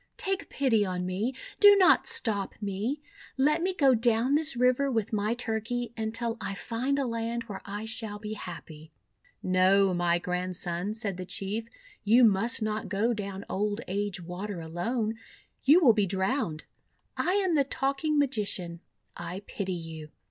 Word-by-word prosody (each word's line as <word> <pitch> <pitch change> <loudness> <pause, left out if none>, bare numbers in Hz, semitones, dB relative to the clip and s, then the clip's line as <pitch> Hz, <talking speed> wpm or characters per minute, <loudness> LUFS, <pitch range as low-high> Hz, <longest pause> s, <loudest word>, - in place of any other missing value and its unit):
Take 390 0 -2
pity 245 -6 +2
on 180 -2 -3
me! 205 +8 -2 0.2
Do 410 -1 +9
not 375 -2 +5
stop 205 -4 +2
me! 210 +8 -3 0.4
Let 300 +4 +3
me 370 +2 +1
go 280 -8 +4
down 235 +2 +2
this 305 -1 +3
river 250 +3 +2
with 225 -4 -1
my 215 +2 0
Turkey, 235 0 -3
until 225 +1 -2
I 195 - -3
find 250 +7 -2
a 275 - 0
land 230 0 -3
where 205 -4 -8
I 205 +2 -5
shall 220 -1 -2
be 210 +1 -6
happy." 160 -5 -9 0.5
"No, 185 +1 +4
my 175 -1 +2
Grandson," 180 +2 -3
said 205 -5 -3
the 185 - -5
Chief. 210 +5 -3 0.4
'You 230 +4 +5
must 230 +3 +3
not 215 -2 -3
go 210 +5 +1
down 200 -2 -5
Old 205 +2 -1
Age 200 0 -2
Water 180 +3 -6
alone. 215 +8 -2 0.5
You 305 +7 +7
wTill 240 -9 +6
be 205 -3 +2
drowned. 190 - -1 0.5
I 360 - 0
am 385 -3 +2
the 290 -3 +4
Talking 275 +3 -1
Magician. 205 -11 -1 0.4
I 175 +3 -6
pity 195 -2 -4
you." 160 -3 -7
215 Hz, 160 wpm, -28 LUFS, 190-250 Hz, 0.5 s, Do